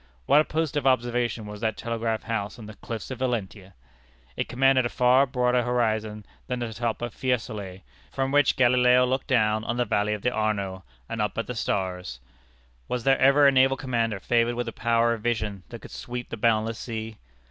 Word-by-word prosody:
What 150 - +5
a - - -2
post 160 -1 -2
of 140 -2 0
observation 120 -3 0
was 105 0 -8
that 110 -2 -1
telegraph 115 -1 -2
house 105 -3 -3
on 115 - -10
the 110 - -9
cliffs 110 +2 -7
of 130 - -6
Valentia! 105 -6 -3 0.6
It - - -3
commanded 135 +1 +3
a 120 - -1
far 125 +3 +4
broader 125 -1 +1
horizon 110 -3 -1 0.2
than 125 - -2
the 120 -2 -4
top 120 0 -3
of 120 -3 -4
Fiesolé, 110 -7 -3 0.3
from 135 0 -1
which 145 +1 +3
Galileo 125 0 +4
looked 130 +1 -2
down 110 -3 +2
on 120 +2 -2
the 125 - +1
valley 105 0 0
of 105 - -10
the 125 - +2
Arno, 100 -4 -2 0.2
and 115 -1 -3
up 105 -2 -2
at 115 - -1
the 125 - -5
stars. 90 - -3 0.7
Was 125 -2 -3
there 135 +1 +3
ever 140 +2 +5
a 140 - +7
naval 135 0 +4
commander 115 -5 -1
favored 120 +3 +1
with 120 0 -3
a - - -3
power 115 0 +2
of 115 - -6
vision 110 -4 -2
that - - -10
could - - -11
sweep 120 0 -6
the - - -4
boundless 110 0 +1
sea? 110 -2 -6
115 Hz, 200 wpm, -26 LUFS, 110-125 Hz, 0.7 s, a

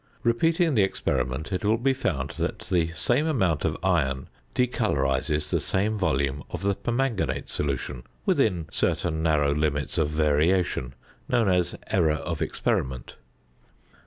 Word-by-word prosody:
Repeating 165 +7 +2
the 110 - +4
experiment, 65 -4 -1
it 90 - -2
will 110 +2 +3
be 135 +3 +2
found 75 - -2
that - - -1
the 85 -3 +2
same 125 - +1
amount 95 - +1
of 80 -1 0
iron 70 -8 +1 0.3
decolorises 75 - 0
the - - +2
same 100 +3 0
volume 70 -8 0
of - - -5
the 100 0 +2
permanganate 120 0 -1
solution 70 -3 -3 0.2
within 90 -7 +2
certain 85 -2 0
narrow 75 -3 +2
limits 75 +1 0
of 75 -2 +2
variation, 75 -2 +1 0.3
known 120 -4 +3
as 90 -1 +1
"error 80 -5 +2
of 70 - -4
experiment." 65 -1 -2
85 Hz, 135 wpm, -26 LUFS, 75-105 Hz, 0.3 s, the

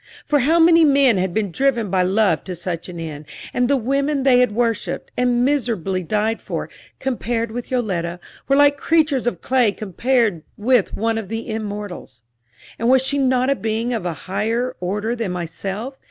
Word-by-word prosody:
For 295 - +2
how 305 +6 +3
many 330 0 +6
men 275 -6 +4
had 185 0 0
been 205 0 -1
driven 240 -3 0
by 190 -1 +2
love 190 -2 +2
to 185 - -5
such 170 0 -4
an 175 -2 -7
end, 155 -2 -6 0.3
and 245 0 +1
the 280 +1 +3
women 275 +3 0
they 255 -2 +5
had 250 -3 +3
worshiped, 230 -1 -2
and 245 0 +2
miserably 225 - 0
died 215 +5 -1
for, - - -5 0.3
compared 235 -3 -2
with 245 +1 -6
Yoletta, 180 -9 -2 0.3
were 275 - +3
like 285 0 +5
creatures 305 -6 +2
of 240 - -2
clay 250 -5 +2
compared 215 -1 0 0.2
with 235 0 +2
one 225 +1 0
of 215 - -7
the 225 +3 -5
immortals. 205 - -6 0.6
And 230 +1 +1
was 260 0 +5
she 280 +1 0
not 260 0 +2
a - - +2
being 225 +1 -2
of 215 -6 -2
a 170 - -2
higher 225 +6 -1
order 210 +6 -2
than 225 -6 -3
myself? 195 +9 -5
230 Hz, 185 wpm, -20 LUFS, 195-260 Hz, 0.6 s, many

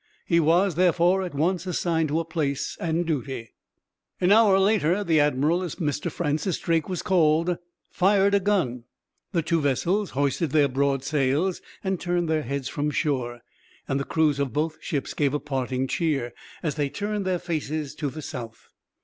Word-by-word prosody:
He 170 - +3
was, 170 +4 +3
therefore, 180 +2 +3
at 180 -5 -5
once 175 +4 0
assigned 165 -3 0
to 155 +3 +1
a 165 - -2
place 155 -4 -2
and 170 +1 0
duty. 135 -7 -3 0.7
An 180 +1 +3
hour 210 -2 +6
later 195 -1 +2
the 165 -5 +3
admiral, 150 +4 +2
as 175 -5 -4
Mr. 150 -4 -2
Francis 155 +2 -1
Drake 165 -1 0
was 180 - -3
called, 170 -1 +2 0.3
fired 195 +1 +3
a 200 - +5
gun, 175 - 0 0.5
the 170 -4 0
two 165 0 +1
vessels 175 +9 +1
hoisted 145 +3 +1
their 150 -2 +5
broad 135 0 0
sails 145 +5 0 0.2
and 190 -2 -1
turned 175 -1 0
their 160 -1 +1
heads 140 0 -3
from 145 +1 -2
shore, 125 -6 -1 0.5
and 135 - 0
the - - -1
crews 150 -2 +1
of 140 -3 -1
both 155 +1 -1
ships 140 -3 -3
gave 145 -1 +1
a - - 0
parting 130 -2 -2
cheer, 135 -5 -1 0.3
as 155 -4 0
they 145 -1 -1
turned 205 +7 -3
their 185 -1 0
faces 155 -3 -3
to 145 -1 -3
the 155 +3 -8
south. 115 -4 -8
155 Hz, 175 wpm, -25 LUFS, 140-180 Hz, 0.7 s, hour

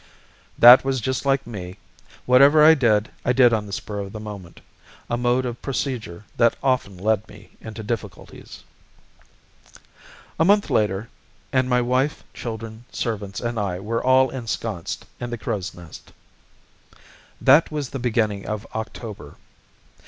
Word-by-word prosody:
That 120 +2 +9
was 135 -1 -1
just 130 +4 -2
like 135 0 +2
me. 95 -5 -8 0.5
Whatever 140 +4 +6
I 160 - +9
did, 110 -7 +2
I 125 - +1
did 125 -2 +5
on 105 -2 -1
the - - -10
spur 105 0 -5
of 100 -1 -6
the 110 - -6
moment, 100 -5 -9 0.5
a - - +2
mode 125 +1 +1
of 120 -1 -5
procedure 120 -9 -4
that 115 -1 +3
often 125 -8 0
led 110 +2 0
me 105 +1 -15
into 110 0 -8
difficulties. 115 0 -7 1.8
A - - +5
month 205 +2 +3
later 105 +1 0 0.5
and 130 -1 +2
my 125 -1 +3
wife, 130 +4 0
children, 115 -1 -7
servants, 100 -4 -4
and 120 -1 -3
I 95 -3 -2
were 115 +4 -3
all 130 0 +4
ensconced 115 -7 -5
in 120 - -5
the 120 - -4
Crow's 105 -5 -4
Nest. 85 -3 -13 1.3
That 145 +5 +5
was 150 -4 -3
in - - -22
the 135 - -5
beginning 110 -4 -1
of 105 0 -4
October. 110 -8 -7
115 Hz, 150 wpm, -22 LUFS, 105-130 Hz, 1.8 s, That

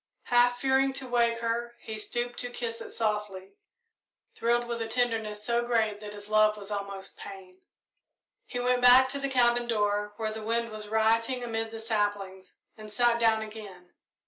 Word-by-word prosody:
Half 245 0 +3
fearing 265 +1 +2
to 265 -1 -4
wake 235 -1 +1
her, 235 +1 -2
he 220 - -7
stooped 240 +3 -3
to 245 - -3
kiss 230 -1 -5
it - - -8
softly, 210 -4 -3 0.8
thrilled 240 +1 +1
with 235 -1 -4
a 225 - -2
tenderness 225 -3 -1
so 235 +1 +1
great 225 -3 0
that 210 -1 -8
his 205 0 -9
love 215 0 +3
was 205 0 -8
almost 200 -1 -5
pain. 190 -1 -11 0.9
He 245 - -4
went 250 0 +1
back 255 +1 +7
to 280 +2 -1
the 275 0 -2
cabin 240 -2 +3
door, 205 -2 0
where 220 -1 -2
the 220 0 -6
wind 230 +1 -1
was 215 -1 -6
rioting 225 +3 +1
amid 225 -1 -3
the 225 0 -8
saplings, 205 -4 -2 0.2
and 215 -1 -11
sat 235 +2 +2
down 220 -1 +3
again. 205 -5 -11
225 Hz, 175 wpm, -28 LUFS, 210-240 Hz, 0.9 s, back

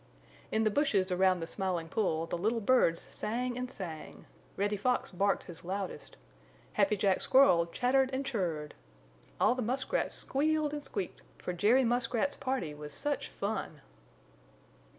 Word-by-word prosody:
In 220 - +2
the 215 - +2
bushes 205 -8 +2
around 185 -1 +3
the - - -2
Smiling 180 -2 -2
Pool 165 -4 0
the 165 - -3
little 220 +5 +1
birds 200 -7 +3
sang 245 +3 -2
and 250 0 -3
sang. 170 -9 -8 0.3
Reddy 205 +1 +1
Fox 245 +5 0
barked 195 +2 +1
his 170 -2 -10
loudest. 190 +2 -5 0.6
Happy 210 - +2
Jack 195 -1 +2
Squirrel 220 -11 +5
chattered 260 +8 +2
and 270 +1 -2
chir 255 -5 -2
r 185 - +2
r 150 - -5
ed. 150 - -11 0.7
All - - +4
the 255 - -3
muskrats 265 - -1
squealed 305 +1 0
and 295 - -3
squeaked, 195 -9 -4 0.2
for 180 - -4
Jerry 220 +9 +4
Muskrat's 245 +3 +1
party 260 - -2
was 150 -1 -8
such 290 -1 -2
fun! 200 -7 -4
210 Hz, 160 wpm, -31 LUFS, 180-255 Hz, 0.7 s, Squirrel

